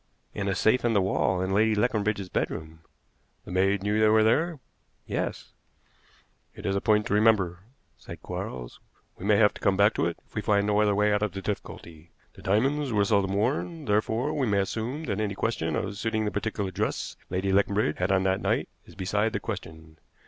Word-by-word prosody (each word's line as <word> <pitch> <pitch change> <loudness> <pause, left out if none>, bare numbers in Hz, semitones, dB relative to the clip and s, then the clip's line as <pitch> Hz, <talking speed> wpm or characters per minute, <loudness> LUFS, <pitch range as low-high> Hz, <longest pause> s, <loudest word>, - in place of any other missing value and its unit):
"In 100 - -3
a 95 - 0
safe 125 +4 +2
in 120 -1 +2
the 100 - +4
wall 95 -1 +1
in 95 +1 -1
Lady 110 +2 +3
Leconbridge's 105 -3 0
bedroom." 80 -2 -3 0.7
"The - - -9
maid 95 +2 +2
knew 105 +1 +1
they 110 - +5
were 110 0 +5
there?" 155 +8 +2 0.5
"Yes." - - -4 1.0
"It - - -10
is 95 - 0
a 100 - 0
point 105 -2 +3
to - - -2
remember," 105 -5 +3 0.4
said - - -10
Quarles. 60 -1 -6 0.4
"We 95 - -6
may 105 0 +4
have 105 -1 +5
to - - -12
come 95 -1 +2
back 100 +2 +5
to - - 0
it 85 - -4
if - - -31
we 105 - -2
find 100 0 +2
no 105 0 +2
other 105 -1 +2
way 105 +1 +3
out 105 - +1
of 105 - -1
the 95 - -5
difficulty. 85 -5 -6 0.2
The - - -14
diamonds 135 +8 +1
were 105 -2 +2
seldom 100 -2 +2
worn, 145 - -1
therefore 110 +7 0
we 140 -5 0
may 100 -2 +2
assume 115 +9 -3
that 100 -9 -2
any 100 -2 -2
question 80 -8 -1
of 100 +3 -3
suiting 110 +1 -1
the 105 - -1
particular 105 -2 -2
dress - - -2
Lady 95 +2 -1
Leconbridge 100 -4 +2
had 90 +2 +1
on 95 -1 +3
that 95 0 +1
night - - 0 0.2
is - - -15
beside 105 +4 0
the - - -1
question. 80 0 -8
105 Hz, 205 wpm, -27 LUFS, 95-110 Hz, 1.0 s, they